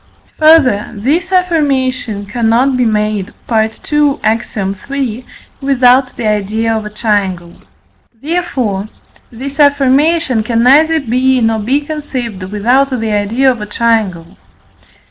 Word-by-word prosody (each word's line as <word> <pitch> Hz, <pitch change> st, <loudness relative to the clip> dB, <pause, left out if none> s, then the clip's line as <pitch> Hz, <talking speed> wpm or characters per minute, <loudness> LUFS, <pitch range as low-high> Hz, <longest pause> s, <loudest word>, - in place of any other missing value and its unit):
Further, 310 Hz, -10 st, +4 dB
this 310 Hz, -, -1 dB
affirmation 265 Hz, -, 0 dB
cannot 235 Hz, +5 st, +1 dB
be 250 Hz, -1 st, +1 dB
made 210 Hz, -3 st, -1 dB, 0.2 s
(II. 275 Hz, +6 st, 0 dB
Ax. 225 Hz, +1 st, -1 dB
iii.) 230 Hz, +5 st, -4 dB, 0.3 s
without 260 Hz, -1 st, +2 dB
the 235 Hz, -, -4 dB
idea 215 Hz, +2 st, -1 dB
of 215 Hz, -1 st, -4 dB
a -, -, -7 dB
triangle. 200 Hz, -5 st, -2 dB, 0.7 s
Therefore, 265 Hz, -, -2 dB, 0.4 s
this 270 Hz, +4 st, -8 dB
affirmation 285 Hz, -1 st, +2 dB
can 230 Hz, +1 st, 0 dB
neither 315 Hz, +5 st, +4 dB
be 260 Hz, 0 st, +1 dB
nor 225 Hz, -1 st, +1 dB
be 260 Hz, +7 st, 0 dB
conceived, 265 Hz, -9 st, -5 dB
without 225 Hz, +8 st, +1 dB
the 225 Hz, -4 st, -2 dB
idea 220 Hz, +6 st, +1 dB
of 240 Hz, -4 st, -6 dB
a 210 Hz, -, -5 dB
triangle. 210 Hz, -6 st, -1 dB
240 Hz, 120 wpm, -13 LUFS, 210-275 Hz, 0.7 s, Further